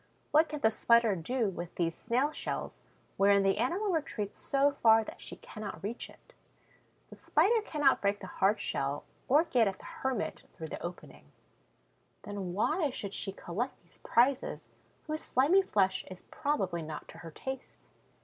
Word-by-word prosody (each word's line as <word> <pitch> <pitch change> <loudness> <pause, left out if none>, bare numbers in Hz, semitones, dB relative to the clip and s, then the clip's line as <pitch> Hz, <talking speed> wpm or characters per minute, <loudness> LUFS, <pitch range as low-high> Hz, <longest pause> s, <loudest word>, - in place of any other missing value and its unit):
What 310 +2 +5
can 300 -1 -5
the 220 - +4
Spider 235 -2 +4
do 225 +6 -1
with 175 -2 -7
these 165 -2 0
snail 255 +6 0
shells - - -4 0.4
wherein 200 0 +5
the 195 +1 +2
animal 360 - 0
retreats 260 - -3
so 280 +1 +2
far 225 -1 +6
that - - -10
she - - -5
cannot 215 -3 -8
reach 225 +4 -4
it? - - -19 0.8
The - - -11
Spider 455 +1 +3
cannot 295 -9 +2
break 200 0 +1
the - - -8
hard 195 +3 +1
shell 140 +1 -2 0.2
or 295 +5 +5
get 245 -9 +3
at 195 -1 -2
the - - -15
hermit 265 -9 -3
through 160 -3 -7
the - - -6
opening. 175 +1 -9 0.9
Then 200 -3 -5
why 300 - +1
should 200 -6 -6
she 195 - -3
collect 200 +7 -4
these - - -17
prizes, 275 - +1 0.4
whose 310 0 -3
slimy 300 +10 +4
flesh 195 - +1
is 185 -1 -10
probably 195 - -1
not 155 -1 -7
to 165 - -11
her 165 0 -8
taste? 265 - -7
220 Hz, 170 wpm, -31 LUFS, 195-280 Hz, 0.9 s, far